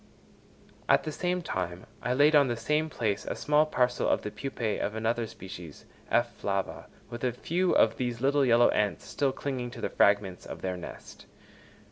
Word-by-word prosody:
At - - +5
the 155 - -4
same 180 +3 -1
time 90 - -4 0.2
I 125 +1 0
laid 145 +3 +5
on 145 -2 +6
the 120 - -1
same 150 +7 0
place 105 -7 -1
a - - -4
small 150 +1 +3
parcel 125 -4 +1
of - - +1
the 105 - -4
pupæ 115 -5 -3
of 105 - -2
another 115 +1 0
species, 95 -8 -10 0.2
F. - - +2
flava, 100 -1 -3 0.2
with 120 +1 -7
a 125 - +2
few 175 +9 0
of 115 0 +4
these 120 -2 -2
little 140 +2 +3
yellow 120 -2 +5
ants 105 -1 0
still 140 -2 0
clinging 130 -2 -4
to - - -10
the - - -1
fragments 100 -2 +2
of - - -8
their 95 -1 -1
nest. 90 - -10
120 Hz, 185 wpm, -29 LUFS, 105-140 Hz, 0.2 s, on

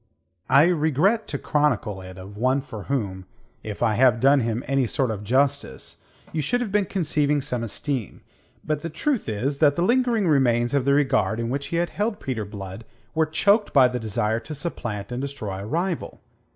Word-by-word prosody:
I 135 +2 +7
regret 175 - +2
to - - -3
chronicle 145 -10 0
it 95 0 -10
of 95 +2 -10
one 130 +5 +1
for 110 -7 -9
whom 100 -9 -2 0.4
if 105 -2 -5
I 110 - +3
have 120 0 +4
done 135 +3 +5
him 115 0 -1
any 135 -2 +1
sort 130 0 0
of 105 -2 -5
justice 130 - 0 0.3
you 160 - -1
should 245 - 0
have 240 -5 -3
been 205 -2 +1
conceiving 150 -5 +1
some 125 -3 -2
esteem. 120 - -3 0.4
But 155 -1 -2
the 165 - -4
truth 220 - -1
is 130 +7 -2
that 145 -2 +4
the 170 - 0
lingering 235 -2 +2
remains 120 -5 +2
of 140 -3 +1
the 140 - +4
regard 135 -5 +2
in 115 0 -2
which 140 +1 -2
he - - -4
had 170 +1 0
held 210 +2 -2
Peter 115 -5 -3
Blood 100 0 -8 0.3
were 160 0 +2
choked 200 +7 +2
by 135 -3 +7
the 125 0 -3
desire 110 0 -1
to 155 +6 -8
supplant 120 - -4
and 125 +1 -3
destroy 110 -9 -5
a 100 - -6
rival. 170 - -2
135 Hz, 195 wpm, -24 LUFS, 110-155 Hz, 0.4 s, I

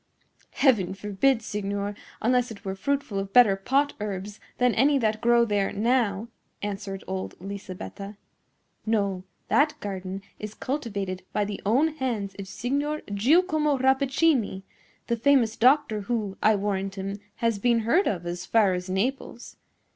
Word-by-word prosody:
"Heaven 215 -10 +2
forbid, 210 +5 +1
signor, 205 -1 -3 0.3
unless 250 +1 +2
it 210 -2 -11
were 190 - -2
fruitful 275 0 -2
of 195 0 -5
better 220 -3 +6
pot 275 +9 +1
herbs 205 0 -5 0.2
than 250 -1 +3
any 280 +4 +4
that 220 -3 0
grow 235 0 +4
there 205 -3 0
now," 225 -1 +1 0.4
answered 200 -1 -4
old 190 0 -5
Lisabetta. 195 +1 -7 0.7
"No; 200 -4 0 0.2
that 300 +2 +3
garden 195 -1 -5 0.2
is 210 0 -7
cultivated 200 -9 -3
by 210 - +1
the 205 0 -5
own 270 +9 +4
hands 220 -8 -2
of 195 - -6
Signor 280 +9 -2
Giacomo 300 - +3
Rappaccini, 265 -5 +2 0.4
the 235 - 0
famous 240 -3 +3
doctor, 250 -3 +3
who, 205 -2 -2
I 215 - +5
warrant 195 -1 -2
him, 195 +1 -4 0.2
has 230 -3 0
been 235 +1 +2
heard 320 - +2
of 175 -4 -2
as 175 +1 -4
far 205 -1 +3
as 180 +1 -4
Naples. 240 +5 -3
215 Hz, 145 wpm, -26 LUFS, 195-255 Hz, 0.7 s, better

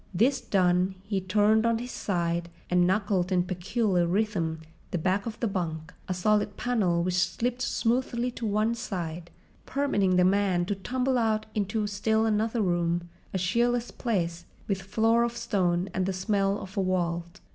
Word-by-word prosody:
This 255 +9 +3
done, 185 0 +2
he 200 -1 -2
turned 210 +3 +3
on 230 -1 +2
his 245 +2 -6
side 170 -2 -1 0.2
and 180 0 +4
knuckled 190 -2 +1
in 180 -1 +3
peculiar 185 0 0
rhythm 175 -5 0 0.3
the - - -1
back 190 +5 0
of 220 - -6
the 235 - 0
bunk, 165 -4 -3
a 185 - -1
solid 205 +2 +1
panel 190 -9 +1
which 180 0 0
slipped 235 +7 0
smoothly 245 0 0
to 230 -2 -4
one 215 +2 +1
side, 175 -7 -5 0.4
permitting 205 -10 +1
the 180 0 +5
man 190 -2 +2
to 205 - -1
tumble 250 +6 0
out 220 -1 +1
into 210 +1 -1
still 220 +2 +1
another 220 +1 +1
room, 175 -1 0 0.2
a - - -1
cheerless 235 +6 +1
place, 175 -7 -2 0.2
with 195 -2 -1
floor 225 +4 +2
of 235 0 -1
stone 185 -6 0
and 185 0 0
the 195 - 0
smell 195 +1 +1
of 195 +2 -5
a - - +2
vault. 175 0 -1
195 Hz, 170 wpm, -27 LUFS, 180-225 Hz, 0.4 s, the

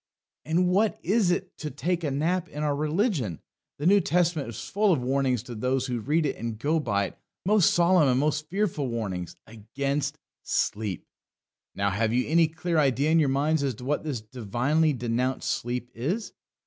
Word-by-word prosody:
And 170 +4 +2
what 200 +4 +2
is 200 +1 +2
it 180 +1 -1
to 155 - -4
take 170 +5 -2
a 150 - 0
nap 170 +6 0
in 150 +1 -5
our 145 -1 +1
religion? 150 - 0 0.4
The 145 - -4
New 200 +3 +6
Testament 165 -6 +1
is 115 - -7
full 205 0 +2
of 140 -8 +1
warnings 130 -2 +1
to 125 - -8
those 125 +3 0
who 125 -3 -2
read 150 +8 +1
it 140 - -2
and 115 -2 -4
go 155 +8 +1
by 100 -8 0
it - - -10 0.3
most 205 -2 +4
solemn 175 -3 +4
and 125 0 +3
most 150 +1 0
fearful 185 -8 -1
warnings 95 -8 -4
against 135 +6 -3 0.2
sleep. 105 -4 -2 0.7
Now, 100 0 0
have 110 +3 0
you 125 +1 +1
any 165 +2 +4
clear 165 +1 -1
idea 140 +1 +2
in 165 - +5
your 145 -3 +3
minds 145 +3 +1
as 135 -4 -1
to 125 - -10
what 145 +2 0
this 140 -7 -3
divinely 125 +8 0
denounced 125 +1 -1
sleep 120 +1 -3
is? 175 - -3
145 Hz, 185 wpm, -27 LUFS, 120-165 Hz, 0.7 s, New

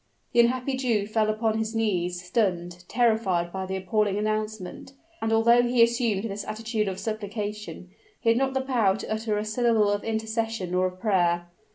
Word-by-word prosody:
The - - +3
unhappy 255 +2 +2
Jew 235 -6 +1
fell 215 0 +1
upon 220 0 0
his 220 +1 -3
knees, 180 -5 0
stunned, 180 -3 -1
terrified 215 -8 +1
by 190 0 -3
the 190 - -3
appalling 200 +2 0
announcement; 215 +1 -3 0.3
and 225 - 0
although 235 +2 +5
he 245 -1 +4
assumed 230 -4 +1
this 205 -2 -4
attitude 220 -1 -2
of 190 -1 -3
supplication, 210 -3 -5 0.3
he 230 - +1
had 230 - +4
not 270 0 0
the 265 - +2
power 235 -7 +2
to - - -7
utter 220 -1 -1
a 210 - -2
syllable 220 -2 +2
of 205 0 -1
intercession 220 -3 -2
or 185 0 +2
of 185 0 -9
prayer. 175 -4 +1
215 Hz, 180 wpm, -26 LUFS, 190-230 Hz, 0.3 s, although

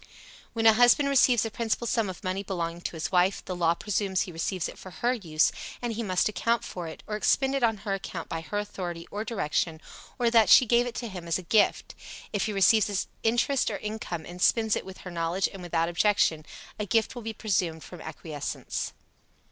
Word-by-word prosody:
When 225 -1 -1
a 225 - +9
husband 245 +5 +5
receives 250 -4 +4
a 225 - -4
principal 230 +1 -1
sum 225 -3 0
of 185 - -8
money 185 +1 -2
belonging 175 -3 -4
to 175 - -5
his 160 - -3
wife, 185 +1 +2
the 185 - -4
law 170 -1 +2
presumes 195 -1 -1
he 180 - -3
receives 170 +2 -2
it - - -10
for 185 - -10
her 240 +7 0
use, 160 -10 +1 0.3
and 240 -2 -3
he 225 - -3
must 185 -5 +1
account 230 +2 0
for 175 -2 -6
it, 160 - -9
or 210 - -4
expend 265 +5 +2
it 275 - 0
on 225 -2 +2
her 200 - 0
account 185 -3 -5
by 165 - -4
her 205 +5 -4
authority 180 -5 -5
or 210 +1 -3
direction, 165 -7 -1 0.4
or 240 -3 +2
that 225 -5 +5
she 255 - +8
gave 240 +1 +3
it 240 - -6
to 240 - -4
him 180 -5 -8
as 165 - +1
a 185 - -8
gift. 210 +5 +2 0.4
If 205 - 0
he - - -2
receives 205 0 +3 0.2
interest 240 +4 +2
or - - -3
income 210 -6 -5
and 180 +1 -9
spends 220 +1 +3
it - - -4
with 190 - -9
her 180 - -8
knowledge 170 +2 0
and 195 - -8
without 165 -1 0
objection, 175 -3 +2 0.3
a 210 - -2
gift 225 +3 +1
will 245 - -7
be 225 0 -4
presumed 180 -7 -1
from 180 - -10
acquiescence. 150 -4 -5
200 Hz, 220 wpm, -27 LUFS, 175-225 Hz, 0.4 s, a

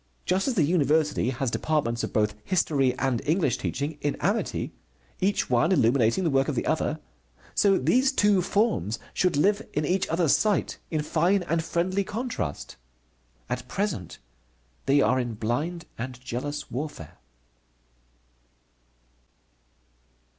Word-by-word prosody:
Just 190 +5 +1
as 260 - 0
the 175 - +3
university 150 -4 +2
has 130 -1 -2
departments 120 -7 0
of - - -3
both 105 -1 +1
History 140 -8 +1
and 130 -3 0
English 150 - +1
teaching 145 +2 -3
in 145 - 0
amity, 205 +5 -1 0.5
each 200 +1 +1
one 125 +8 +2
illuminating 120 0 +3
the 165 - +1
work 135 0 +2
of - - -1
the - - -1
other, - - 0 0.5
so 195 -2 +4
these 255 - +3
two 205 -7 +3
forms 170 - 0 0.2
should 180 -5 +1
live 200 +7 +3
in 150 - 0
each 185 +4 +1
other's 165 -3 +3
sight 210 -2 0
in 155 -2 -1
fine 185 +5 +2
and 165 -1 0
friendly 175 +4 0
contrast. 210 - -4 0.7
At - - -4
present 190 - -3 0.7
they 140 +1 +5
are 130 +2 +3
in 120 -3 -3
blind 145 +11 -2
and 125 +1 -5
jealous 130 +4 -5
warfare. 130 - -6
150 Hz, 135 wpm, -26 LUFS, 130-185 Hz, 0.7 s, they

